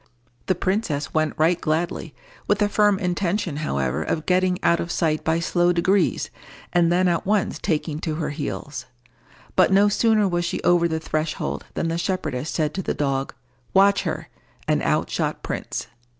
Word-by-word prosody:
The 185 - +2
princess 180 -6 -1
went 155 -1 +1
right 165 +3 +2
gladly, 160 -1 -2 0.3
with 205 - +3
the 205 0 +2
firm 205 -1 +3
intention, 180 -2 -1
however, 70 - -1
of 155 - -2
getting 185 0 +2
out 170 - +3
of 170 - -3
sight 155 -3 0
by 160 +1 +1
slow 175 +1 +2
degrees, 185 +3 +1 0.4
and 170 -1 +4
then 180 +1 +3
at 170 -1 +1
once 210 -1 +1
taking 155 -3 -1
to 155 -1 -3
her 155 -2 -2
heels. 145 -2 -5 0.7
But - - +4
no 200 +2 +5
sooner 215 0 +3
was 175 -1 0
she 170 - -2
over 175 -1 +4
the 160 -1 -2
threshold 155 0 -3
than 165 - -1
the 165 +1 -1
shepherdess 155 -7 -2
said 155 -2 -1
to 190 - -2
the - - -2
dog, 135 -2 -1 0.4
"Watch 200 +1 +5
her;" - - -4 0.4
and - - +2
out - - 0
shot - - -2
Prince. - - -4
170 Hz, 175 wpm, -23 LUFS, 155-185 Hz, 0.7 s, no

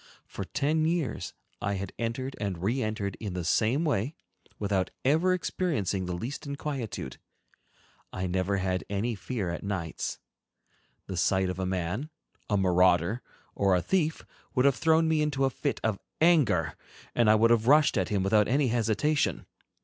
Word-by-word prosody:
For - - -6
ten 155 +3 0
years 160 -8 -1 0.3
I 100 - 0
had 95 -1 -5
entered 120 +3 -3
and 95 -4 -3
re 120 +7 +1
entered 110 -3 -2
in 100 -5 -5
the 90 - -2
same 125 - +2
way, 140 0 0 0.4
without 100 -3 0 0.2
ever 160 +7 +3
experiencing 145 - -1
the 90 - -2
least 125 - -5
inquietude. 135 - -4 0.9
I 95 - -3
never 95 +2 0
had 95 -1 -1
any 100 +4 -1
fear 100 -3 -3
at 85 - -4
nights. 95 -5 -3 0.9
The 95 - -5
sight 95 +1 +2
of 90 - -7
a 95 - -1
man, 95 - -2 0.4
a 105 - +2
marauder, 90 +3 +3 0.3
or 100 -2 +3
a 90 - +2
thief 160 -4 0 0.3
would 130 0 +3
have 140 - +6
thrown 160 +1 +3
me 160 -1 +2
into 140 -3 +1
a 135 - +1
fit - - -2
of 110 -3 0 0.2
anger, 145 - +3 0.4
and 120 -3 +3
I 110 - +7
would 115 +2 +4
have 115 -1 +3
rushed 150 +2 +5
at 95 -4 0
him 100 -3 +1
without 105 +1 +3
any 135 +2 +2
hesitation. 120 +6 +1
110 Hz, 165 wpm, -28 LUFS, 95-140 Hz, 0.9 s, I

